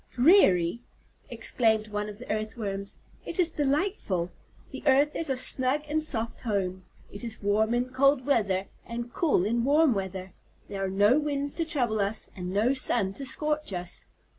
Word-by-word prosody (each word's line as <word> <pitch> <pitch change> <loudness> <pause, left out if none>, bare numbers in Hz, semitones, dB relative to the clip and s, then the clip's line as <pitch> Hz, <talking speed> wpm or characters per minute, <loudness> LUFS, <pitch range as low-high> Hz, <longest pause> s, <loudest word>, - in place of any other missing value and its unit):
"Dreary!" 235 - +4 0.5
exclaimed 220 -3 +1
one 210 0 -3
of 205 - -9
the 250 - -10
Earthworms, 215 -2 -4 0.3
"it - - -6
is 345 -3 +6
delightful. 280 - -1 0.4
The - - -7
earth 285 +2 +4
is 325 - -2
a 265 - 0
snug 260 +3 +1
and 310 +1 0
soft 230 -7 -2
home. 190 -5 -2 0.3
It 200 - -9
is 225 -3 -4
warm 215 +3 +2
in 245 +1 -1
cold 270 0 +3
weather 200 -9 +1 0.2
and 235 +1 -6
cool 285 - +2
in 230 +2 0
warm 290 +1 +4
weather. 190 -2 -5 0.3
There 195 -1 -4
are 190 - -1
no 205 +8 +4
winds 285 -1 -2
to 330 - -2
trouble 245 -9 -1
us, 200 +2 -2
and 180 -2 -5
no 215 +7 +2
sun 230 -7 0
to 275 +5 -7
scorch 300 -3 -2
us." 175 0 -5
230 Hz, 170 wpm, -27 LUFS, 200-280 Hz, 0.5 s, is